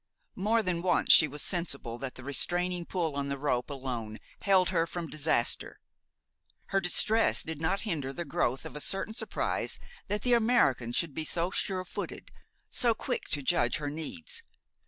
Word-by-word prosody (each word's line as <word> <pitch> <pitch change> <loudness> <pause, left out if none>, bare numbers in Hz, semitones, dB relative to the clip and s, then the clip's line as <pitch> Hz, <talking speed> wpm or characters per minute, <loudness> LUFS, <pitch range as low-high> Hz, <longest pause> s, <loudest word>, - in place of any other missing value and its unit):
More 220 +4 +1
than 180 -3 -1
once 180 0 +4
she 155 - +8
was 150 0 -5
sensible 140 -9 -1
that 135 0 -5
the 130 - -10
restraining 175 +5 +1
pull 165 -6 -1
on 140 0 -2
the 140 0 -2
rope 135 -2 -1
alone 125 -6 -5 0.2
held 190 -2 +4
her 170 -2 +1
from 175 0 -4
disaster. 155 -5 0 0.9
Her 195 - +2
distress 215 +5 +3
did 160 -1 -5
not 165 +5 0
hinder 155 -11 -2
the 170 +5 -5
growth 130 -2 0
of - - -8
a 150 - -5
certain 195 +6 -1
surprise 225 - -1 0.3
that 210 0 -2
the 245 - +3
American 220 - +3
should 150 +4 0
be 160 - -3
so 170 +3 -1
sure 185 -1 -2
footed, - - -6 0.4
so 235 -2 +4
quick - - -3
to 145 -2 -2
judge 175 +5 +2
her 145 -2 -3
needs. 245 - -4
165 Hz, 175 wpm, -30 LUFS, 140-190 Hz, 0.9 s, she